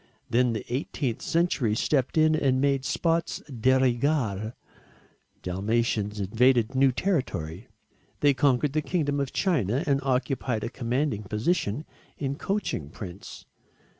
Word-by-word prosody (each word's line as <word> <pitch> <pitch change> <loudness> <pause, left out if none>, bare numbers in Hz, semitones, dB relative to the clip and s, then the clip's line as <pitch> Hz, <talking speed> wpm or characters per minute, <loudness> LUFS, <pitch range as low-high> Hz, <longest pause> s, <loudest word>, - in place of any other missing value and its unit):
Then 120 0 +3
the 110 - -3
18th 125 -1 -3
century 165 -10 +1
stepped 135 +4 0
in 155 0 +5
and 130 -4 +2
made 135 -1 +1
spots 165 +5 0
de 130 -1 +1
rigueur 120 -4 0 0.9
Dalmatians 105 +2 -1
invaded 120 +4 +3
new 135 0 +4
territory. 105 - -2 0.5
They 145 -1 +5
conquered 135 +1 +2
the 155 - +1
kingdom 145 -4 -1
of 140 -2 -2
china 140 - +1
and 140 -3 +2
occupied 130 -3 -1
a 115 - -2
commanding 125 -1 -1
position 110 - -1 0.3
in 135 -1 -2
coaching 175 - -2
prints. 90 +2 -9
130 Hz, 125 wpm, -27 LUFS, 110-145 Hz, 0.9 s, in